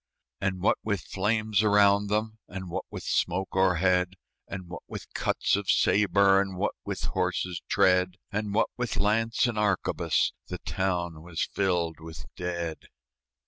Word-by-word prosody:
And 95 -2 -1
what 100 - +2
with 100 -4 -1
flames 105 +3 0
around 100 -1 +4
them, 110 +2 -1
And 95 -1 -7
what - - -3
with - - -7
smoke 95 +2 -1
o'erhead, 90 0 +3 0.3
And 95 -2 -7
what 85 - -8
with - - -7
cuts - - +1
of 100 -1 -3
sabre, 100 -1 +4
And 95 -2 -4
what - - 0
with - - -4
horses' 90 -2 -1
tread, 90 0 +3 0.2
And 105 0 -2
what 110 +3 +2
with 125 -1 -2
lance 115 +4 +2
and 120 -3 -1
arquebus, 100 -3 +1
The - - -5
town 85 -4 -2
was 85 -1 -3
filled 85 -5 0
with 80 0 -9
dead. 85 -2 -4
95 Hz, 150 wpm, -28 LUFS, 90-105 Hz, 0.3 s, around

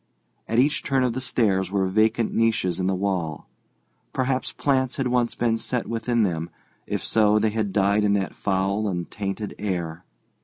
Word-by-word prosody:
At 115 - -1
each 145 +6 +3
turn 135 -2 +1
of 125 -2 +1
the 130 - -3
stairs 100 -7 +1
were 95 0 +1
vacant 110 +4 +2
niches 105 -6 +1
in 90 - 0
the 95 - +1
wall. 90 -5 -2 0.7
Perhaps 130 0 0
plants 130 -3 0
had 135 -2 -1
once 120 -1 +1
been 115 -1 +1
set 125 0 -1
within 115 0 0
them. 85 -3 -1 0.4
If - - -2
so 105 -1 +3
they 110 0 +2
had 105 -2 -1
died 100 +1 +2
in 100 -1 +3
that 100 -1 -1
foul 100 +2 0
and 85 -3 -3
tainted 100 +1 -4
air. 90 -4 -3
105 Hz, 180 wpm, -24 LUFS, 95-120 Hz, 0.7 s, each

